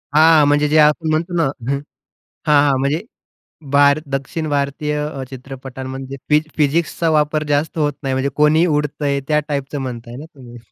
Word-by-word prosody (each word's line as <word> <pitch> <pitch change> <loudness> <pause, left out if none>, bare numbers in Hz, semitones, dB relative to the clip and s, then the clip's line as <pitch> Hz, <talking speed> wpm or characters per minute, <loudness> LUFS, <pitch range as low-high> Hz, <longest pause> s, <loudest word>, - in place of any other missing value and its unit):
हां, 155 -1 +6
म्हणजे 145 +1 +3
जे 155 - +3
आपण 155 +2 +3
म्हणतोना 165 +2 0 0.3
हं, 140 - 0 0.7
हां, 145 -1 +5
हां. 135 - +2
म्हणजे 140 +4 0 0.7
भार 140 +1 +5
दक्षिण 150 +4 -3
भारतीय 145 +1 -1
अ, 140 -3 -6
चित्रपटांमध्ये 130 0 -8
फिज 150 +1 +4
फिजिक्सचा 165 +2 +1
वापर 150 0 +1
जास्त 145 +3 0
होत 145 -1 +1
नाही 135 -2 -1
म्हणजे 130 +1 0
कोणी 150 +2 +4
उडतंय 145 -2 -1
त्या 150 -1 +3
टाईपचं 140 0 -3
म्हणताय 120 -2 -6
ना 145 - -8
तुम्ही? 120 -3 -12
145 Hz, 155 wpm, -19 LUFS, 135-155 Hz, 0.7 s, हां